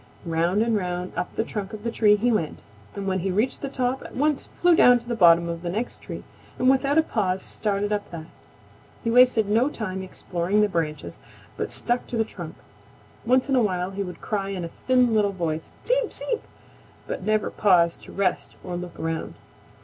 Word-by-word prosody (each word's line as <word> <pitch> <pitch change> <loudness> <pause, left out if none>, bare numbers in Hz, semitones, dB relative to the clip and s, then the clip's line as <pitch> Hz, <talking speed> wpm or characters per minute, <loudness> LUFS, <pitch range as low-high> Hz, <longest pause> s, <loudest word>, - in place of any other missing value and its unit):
Round 170 +5 +1
and 230 -1 +1
round 180 -2 -2
up - - -3
the - - +1
trunk 205 -3 -5
of 210 -1 -7
the 230 - -1
tree 210 -2 +4
he 235 +4 +1
went, 165 -9 -1 0.3
and 200 - -4
when 190 -1 0
he 190 +2 -2
reached 215 +8 0
the 275 - -3
top 260 0 -1
at - - -10
once 295 +1 +1
flew 350 -1 +5
down 245 -5 +7
to 240 0 -10
the 240 - -1
bottom 170 -5 +6
of 170 0 -4
the 175 - -3
next 220 +7 -3
tree - - -7 0.3
and 255 +1 +4
without 275 +2 +2
a 320 - +6
pause 190 -8 -1
started 205 0 -1
up 205 -1 -3
that. 165 -3 -7 0.8
He 230 - 0
wasted 245 -3 +5
no 230 +7 +3
time 190 -8 -4
exploring 185 +1 -1
the 210 - +4
branches, 160 -4 -3 0.4
but - - -3
stuck 240 +1 -1
to 240 - -3
the 225 - +3
trunk. 175 -7 -8 0.7
Once 255 +2 +3
in 270 - +2
a 250 - +4
while 185 -3 0
he 195 +1 -4
would 180 -2 -6
cry 195 -2 -2
in 185 -3 -3
a 165 - -8 0.2
thin 250 -2 +4
little 205 -2 +2
voice, 160 -3 -3
"Seep! - - +1
Seep!" 480 -2 -3 0.6
but - - -4
never 215 0 0
paused 175 -5 +3
to - - -11
rest 180 -8 -1
or 180 -1 -5
look 175 -1 -7
around. 165 0 -3
205 Hz, 210 wpm, -25 LUFS, 180-240 Hz, 0.8 s, down